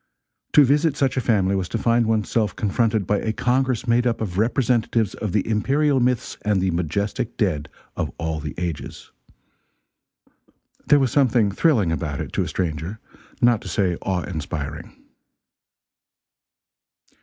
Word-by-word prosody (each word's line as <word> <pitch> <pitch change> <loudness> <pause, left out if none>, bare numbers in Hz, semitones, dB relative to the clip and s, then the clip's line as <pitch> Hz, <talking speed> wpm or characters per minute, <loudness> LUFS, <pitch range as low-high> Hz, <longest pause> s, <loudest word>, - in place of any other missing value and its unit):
To 150 - +8
visit 145 +2 +2
such 135 -2 +1
a 130 - +1
family, 100 -5 +2
was 95 -2 -2
to - - -2
find 115 0 +2
one's 110 -2 +1
self 105 -5 0
confronted 110 0 0
by 105 +2 +1
a 110 - -1
congress 125 +1 0
made 120 +1 +3
up 115 - 0
of 100 -4 -3
representatives 115 -2 +1
of 105 -4 -4
the 100 +1 0
imperial 135 +6 +2
myths 125 -1 -1
and 105 -2 +1
the 95 0 +1
majestic 100 +7 -2
dead 75 -8 -1 0.3
of - - -2
all 80 -1 -3
the 75 -3 -6
ages. 85 -3 -5 1.8
There 145 - +6
was 135 -4 +1
something 120 -7 +3
thrilling 105 - +2
about 75 -3 -3
it, - - -6
to - - 0
a - - -1
stranger, 85 +3 -3 0.4
not 120 -3 +4
to - - -9
say 90 -1 0
awe 95 -2 -1
inspiring. 75 -2 -5
105 Hz, 155 wpm, -22 LUFS, 90-120 Hz, 1.8 s, To